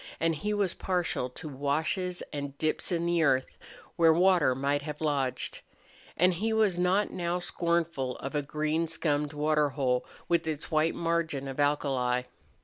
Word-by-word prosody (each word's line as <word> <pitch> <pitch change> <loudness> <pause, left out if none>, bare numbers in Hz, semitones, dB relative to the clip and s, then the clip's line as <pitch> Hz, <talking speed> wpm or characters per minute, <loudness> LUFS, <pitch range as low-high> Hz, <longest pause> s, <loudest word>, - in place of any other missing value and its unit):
And 165 0 +2
he 205 +8 -3
was 200 -4 +1
partial 175 -8 -1
to 125 - -9
washes 155 +6 -1
and 140 -1 -5
dips 155 +4 -1
in 170 -1 0
the 170 -1 +2
earth 130 -4 +1 0.4
where 165 -2 +6
water 175 -5 +4
might 140 +2 0
have 150 0 -6
lodged. 140 -4 -1 0.6
And 180 +2 +4
he 215 +6 -1
was 210 -5 +2
not 185 +3 +2
now 175 0 -1
scornful 170 -7 -1
of 135 - -6
a 150 - +1
green 155 +3 -1
scummed 150 -2 -1
water 150 0 +2
hole 130 -3 0 0.2
with 170 -2 +1
its 155 +1 -4
white 155 +1 +2
margin 165 -5 -1
of 135 +1 -6
alkali. 135 -4 +1
155 Hz, 160 wpm, -29 LUFS, 140-170 Hz, 0.6 s, where